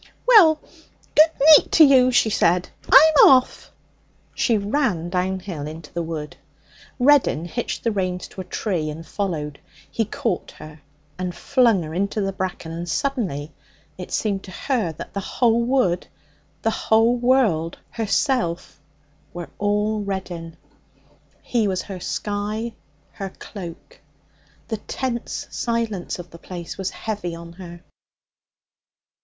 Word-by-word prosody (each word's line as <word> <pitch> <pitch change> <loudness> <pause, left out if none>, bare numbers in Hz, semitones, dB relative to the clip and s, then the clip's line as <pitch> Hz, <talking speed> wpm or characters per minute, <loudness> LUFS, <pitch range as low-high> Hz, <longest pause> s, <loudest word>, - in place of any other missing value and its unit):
'Well, 360 -11 +7 0.5
good 310 +2 +7 0.3
neet - - +3
to 320 - +8
you,' 260 -3 +6
she 235 -3 +3
said. 180 -2 +2 0.2
'I'm 310 +2 +8
off.' 255 -1 +3 0.6
She 230 -3 +2
ran 205 - -1
downhill 180 -4 -2
into 155 0 -10
the 170 - -2
wood. 160 -2 -6 0.6
Reddin 255 - +3
hitched 240 +7 -4
the 230 - +1
reins 185 -3 -2
to 190 - -8
a - - -9
tree 175 -4 -2
and 160 +2 -7
followed. 155 -6 -4 0.3
He 225 - 0
caught 215 -2 -3
her 155 0 -12 0.4
and 180 -1 -3
flung 235 -9 +2
her 155 0 -7
into 200 +4 -1
the 195 -1 -1
bracken, 185 -3 -4
and 170 +1 -5
suddenly 180 - -2 0.4
it 180 +1 -9
seemed 200 -3 -1
to - - -11
her 230 -6 -1
that - - -9
the 200 - -2
whole 230 +3 +1
world, 235 -9 +1 0.6
the 225 - +1 0.5
woods, 215 -11 +2
herself, 225 - -1 0.5
were 175 -1 -7
all 210 +1 0
Reddin. 180 -4 -5 0.9
He 230 -4 0
was 185 -2 -1
her 190 -2 -7
sky, 210 +4 -3 0.4
her 195 -1 -6
cloak. 190 - -10 0.7
The 220 - -2
tense 240 +2 -4
silence 230 -6 -2
of 175 -1 -10
the 170 - -12
place 175 -1 -7
was 190 -1 -3
heavy 205 -6 -5
on 170 0 -10
her. 175 -1 -11
195 Hz, 135 wpm, -22 LUFS, 170-235 Hz, 0.9 s, to